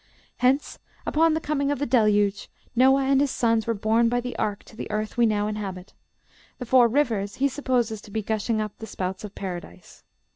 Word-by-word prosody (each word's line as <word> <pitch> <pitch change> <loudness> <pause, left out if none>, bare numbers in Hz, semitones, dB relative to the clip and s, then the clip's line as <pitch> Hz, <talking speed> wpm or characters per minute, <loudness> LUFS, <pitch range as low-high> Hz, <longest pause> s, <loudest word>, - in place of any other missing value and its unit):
Hence, 260 +3 +1 0.3
upon 320 +1 +3
the - - 0
coming 285 -2 -1
of 290 - 0
the 285 - -1
Deluge, 210 -5 +2 0.3
Noah 265 +2 +5
and 270 0 +3
his 285 - +2
sons 230 -3 +1
were 230 - +1
borne 225 +3 +2
by 245 +1 +1
the 245 0 -5
ark 205 -2 -2
to - - -16
the - - -6
earth 215 0 -3
we 235 -1 +4
now 210 -1 +1
inhabit. 195 -3 -5 0.6
The 250 - -6
four 245 0 +5
rivers 225 -6 0
he 275 - +2
supposes 245 -6 -1
to - - -14
be 215 +1 -3
gushing 220 +1 -1
up 210 -1 -3
the 220 - -7
spouts 185 0 -4
of 205 -2 -8
Paradise." 175 - -8
225 Hz, 205 wpm, -25 LUFS, 210-260 Hz, 0.6 s, Noah